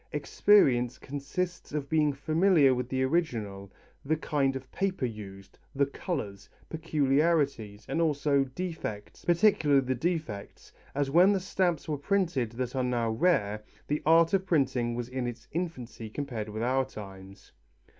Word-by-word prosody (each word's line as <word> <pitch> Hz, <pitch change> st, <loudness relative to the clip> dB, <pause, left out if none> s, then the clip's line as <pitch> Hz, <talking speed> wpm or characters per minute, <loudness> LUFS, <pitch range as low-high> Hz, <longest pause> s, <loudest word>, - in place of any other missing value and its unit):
Experience 125 Hz, -, +3 dB
consists 145 Hz, +6 st, -5 dB
of 145 Hz, -2 st, -2 dB
being 155 Hz, -1 st, +2 dB
familiar 155 Hz, 0 st, +3 dB
with 125 Hz, 0 st, -3 dB
the 130 Hz, 0 st, 0 dB
original, 115 Hz, -, -2 dB, 0.3 s
the 155 Hz, +3 st, 0 dB
kind 140 Hz, -3 st, 0 dB
of 130 Hz, 0 st, -8 dB
paper 190 Hz, -8 st, -1 dB
used, 100 Hz, -4 st, -9 dB, 0.2 s
the 140 Hz, +1 st, +3 dB
colours, 135 Hz, -, -5 dB, 0.2 s
peculiarities 145 Hz, -8 st, 0 dB
and 165 Hz, -, -1 dB
also 145 Hz, -3 st, +2 dB
defects, 135 Hz, -, -6 dB
particularly 170 Hz, -6 st, +4 dB
the 130 Hz, -, 0 dB
defects, 140 Hz, -, -4 dB, 0.2 s
as 140 Hz, -1 st, 0 dB
when 180 Hz, +6 st, +6 dB
the 195 Hz, -, +1 dB
stamps 180 Hz, -3 st, -1 dB
were 150 Hz, -3 st, -2 dB
printed 150 Hz, -, 0 dB
that 125 Hz, +1 st, -4 dB
are 130 Hz, -, 0 dB
now 120 Hz, -2 st, 0 dB
rare, 110 Hz, -, +1 dB, 0.2 s
the 150 Hz, +1 st, -1 dB
art 165 Hz, +2 st, +5 dB
of 190 Hz, -1 st, +3 dB
printing 130 Hz, -7 st, +1 dB
was 120 Hz, -1 st, -4 dB
in 125 Hz, -1 st, -3 dB
its 120 Hz, -1 st, -7 dB
infancy 125 Hz, -10 st, -5 dB
compared 115 Hz, -4 st, -5 dB
with 110 Hz, +2 st, -4 dB
our 130 Hz, +2 st, +2 dB
times. 95 Hz, -4 st, -11 dB
140 Hz, 145 wpm, -29 LUFS, 120-165 Hz, 0.3 s, when